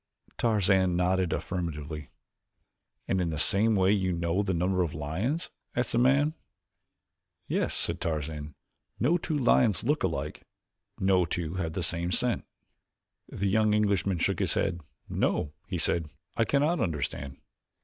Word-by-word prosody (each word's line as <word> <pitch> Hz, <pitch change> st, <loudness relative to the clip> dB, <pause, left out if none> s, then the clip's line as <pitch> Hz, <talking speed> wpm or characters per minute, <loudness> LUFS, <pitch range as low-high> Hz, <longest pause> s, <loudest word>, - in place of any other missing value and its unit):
Tarzan 95 Hz, -5 st, +3 dB
nodded 90 Hz, 0 st, +1 dB
affirmatively. 75 Hz, -5 st, -4 dB, 1.0 s
"And 95 Hz, -1 st, +1 dB
in 85 Hz, -, 0 dB
the 80 Hz, -, -3 dB
same 105 Hz, +8 st, +4 dB
way 95 Hz, 0 st, +4 dB
you 95 Hz, -3 st, +1 dB
know 85 Hz, +2 st, 0 dB
the 100 Hz, -2 st, -1 dB
number 90 Hz, +2 st, +1 dB
of 85 Hz, -2 st, -1 dB
lions?" 95 Hz, -, -2 dB, 0.2 s
asked 125 Hz, -1 st, 0 dB
the 120 Hz, -, +2 dB
man. 140 Hz, +5 st, +4 dB, 1.1 s
"Yes," -, -, 0 dB
said -, -, 0 dB
Tarzan. 75 Hz, -2 st, -3 dB, 0.4 s
"No 155 Hz, +8 st, +3 dB
two 160 Hz, -3 st, -2 dB
lions 120 Hz, -, +3 dB
look 150 Hz, +6 st, +1 dB
alike, 75 Hz, -5 st, -2 dB, 0.6 s
no 95 Hz, -1 st, +3 dB
two 85 Hz, -1 st, -3 dB
have 80 Hz, -4 st, -2 dB
the 90 Hz, -, -2 dB
same 85 Hz, +1 st, -1 dB
scent." -, -, +1 dB, 0.8 s
The 100 Hz, -, -3 dB
young 105 Hz, +1 st, +3 dB
Englishman 100 Hz, -3 st, +1 dB
shook 85 Hz, -, 0 dB
his -, -, +1 dB
head. 85 Hz, -, 0 dB, 0.3 s
"No," 75 Hz, -, 0 dB
he 95 Hz, -3 st, -2 dB
said, 80 Hz, -1 st, +1 dB, 0.3 s
"I 115 Hz, -, +2 dB
cannot 150 Hz, +7 st, +2 dB
understand." 70 Hz, -4 st, -3 dB
90 Hz, 145 wpm, -28 LUFS, 80-105 Hz, 1.1 s, same